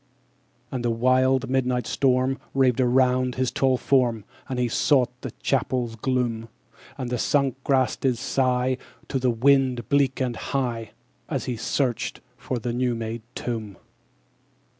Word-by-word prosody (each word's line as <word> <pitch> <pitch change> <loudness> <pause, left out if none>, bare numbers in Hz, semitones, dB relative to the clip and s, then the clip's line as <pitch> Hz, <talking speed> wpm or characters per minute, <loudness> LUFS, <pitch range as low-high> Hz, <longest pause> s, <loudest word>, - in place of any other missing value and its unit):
11. - - -5
And 125 - -2
the - - +2
wild 130 +3 +2
midnight 125 -2 0
storm 130 +1 +1 0.2
Raved 130 -2 +3
around 125 0 +2
his 130 -1 0
tall 130 -1 +2
form, 120 -6 +1 0.2
_60 - - -11
As - - -3
he 125 -1 +1
sought 125 0 +2
the - - -5
chapel's 125 -3 0
gloom: 115 -1 -1 0.5
And 125 -1 -4
the 125 - -1
sunk 135 -1 +1
grass 130 -3 +2
did 130 -3 0
sigh 130 +1 +1 0.3
To 135 - 0
the 130 0 +2
wind, 125 -1 +2
bleak 140 -2 +2
and 125 -3 -1
high, 120 -5 -3 0.4
As - - -2
he 125 - -2
searched 120 +2 -1 0.2
for 130 - -4
the 120 +1 -3
new 125 0 0
made 115 0 -4
tomb. 110 -5 -4
125 Hz, 155 wpm, -25 LUFS, 120-130 Hz, 0.5 s, Raved